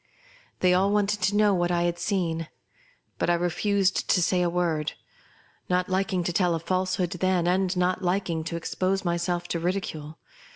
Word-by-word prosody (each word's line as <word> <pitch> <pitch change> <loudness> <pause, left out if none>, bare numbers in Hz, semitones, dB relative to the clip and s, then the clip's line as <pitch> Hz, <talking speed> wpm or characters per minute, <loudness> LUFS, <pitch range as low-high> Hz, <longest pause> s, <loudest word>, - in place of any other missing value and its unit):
They 180 -1 +4
all 190 +2 +3
wanted 210 0 +1
to 195 +3 +1
know 210 -1 +4
what 175 -1 +1
I 175 -1 +1
had 175 0 -1
seen; 170 -4 -1 0.7
but - - +1
I 175 - +4
refused 190 +3 0
to - - +4
say 180 +1 +2
a 175 - +2
word; 170 -3 -1 0.8
not 180 +1 +1
liking 190 -1 0
to 175 - -2
tell 175 -2 +2
a - - -2
falsehood 185 +1 -1
then, 185 -1 +1
and 185 +1 +1
not 180 +1 +1
liking 175 -3 -1
to 170 - -4
expose 185 +3 -1
my 170 0 +1
self 175 0 -2
to 170 - -1
ridicule. 165 -4 -3
180 Hz, 180 wpm, -26 LUFS, 170-190 Hz, 0.8 s, They